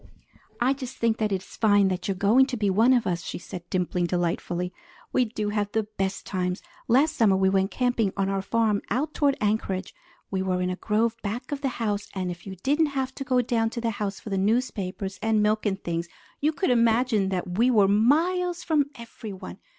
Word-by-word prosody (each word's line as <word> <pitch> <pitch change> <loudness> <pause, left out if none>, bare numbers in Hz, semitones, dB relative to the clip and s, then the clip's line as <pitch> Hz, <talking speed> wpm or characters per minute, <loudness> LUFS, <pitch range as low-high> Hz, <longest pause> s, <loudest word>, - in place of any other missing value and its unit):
"I 250 +3 +3
just 265 -2 -7
think 230 -1 +1
it 215 -1 +1
is 190 -1 -1
fine 205 -1 +3
that 185 +2 -3
you 195 - +1
are - - -11
going 225 +7 +5
to 255 -2 -3
be 205 -3 +1
one 225 +6 +4
of 245 -3 +3
us," 175 -1 -1
she - - -5
said, 175 0 -9
dimpling 180 -1 0
delightfully. 175 +1 -1 0.4
"We 255 - +3
do 215 -2 -3
have 205 -1 -1
the 220 - +1
best 195 -2 -3
times! 180 -1 -2 0.2
Last 275 +7 +3
summer 210 -4 +4
we 190 0 +3
went 190 0 +2
camping 245 -5 +1
on 195 0 +1
our 195 0 0
farm 215 0 +1
out 280 +8 -1
toward 280 -2 +2
Anchorage. 205 -3 -1 0.4
We 190 -1 0
were 185 -1 0
in 180 0 0
a - - -2
grove 220 +3 0
back 225 +8 -4
of 285 -1 -3
the 275 - 0
house, 210 -3 -1
and 185 -2 -2
if 175 +2 -10
you 190 - -6
didn't 300 +3 +3
have 265 0 -1
to 275 - -5
go 255 -2 +2
down 225 -1 +1
to 235 - -5
the 230 -1 0
house 205 -2 -3
for 215 - -9
the 195 - +1
newspapers 195 -3 -1
and 220 -1 +2
milk 215 +1 +1
and 195 -1 -1
things, 170 0 -2 0.3
you 300 +2 +2
could 310 0 0
imagine 230 -3 +3
that 180 0 -3
we 245 +2 +5
were 210 -5 +5
miles 335 - +2
from 305 -4 +2
everyone. 215 -5 -9
210 Hz, 220 wpm, -26 LUFS, 190-245 Hz, 0.4 s, going